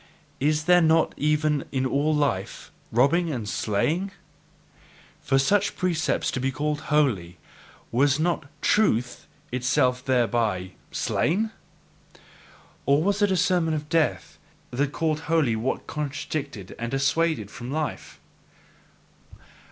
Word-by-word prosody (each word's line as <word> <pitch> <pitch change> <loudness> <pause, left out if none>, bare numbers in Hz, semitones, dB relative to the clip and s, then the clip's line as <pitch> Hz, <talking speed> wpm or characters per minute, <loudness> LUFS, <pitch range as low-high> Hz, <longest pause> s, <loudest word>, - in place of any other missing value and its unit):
Is 150 +2 +1
there 180 +2 +5
not 160 0 +3
even 150 0 +1
in 130 -1 0
all 140 +4 +1
life 145 -11 -1 0.2
robbing 145 +9 +3
and 120 -7 -4
slaying? 150 - 0
And - - -22 1.1
for 135 +1 +1
such 185 +10 +2
precepts 170 -4 0
to - - -3
be 135 +1 0
called 150 +2 -2
holy, 105 - +1 0.5
was 140 +4 +3
not 165 -3 0 0.2
TRUTH 125 - +1 0.2
itself 125 0 +1
thereby 115 -8 0 0.2
slain? 215 +7 0 1.4
Or 140 +2 +4
was 200 +2 +1
it 205 - +4
a 190 - +1
sermon 170 -2 +2
of 150 0 -5
death 165 -2 0 0.3
that 140 +3 0
called 155 -1 -1
holy 155 -9 +3
what 120 +4 -2
contradicted 145 - -5
and 115 0 -3
dissuaded 140 -4 0
from 120 - -8
life? 155 +2 -4
145 Hz, 120 wpm, -25 LUFS, 125-160 Hz, 1.4 s, there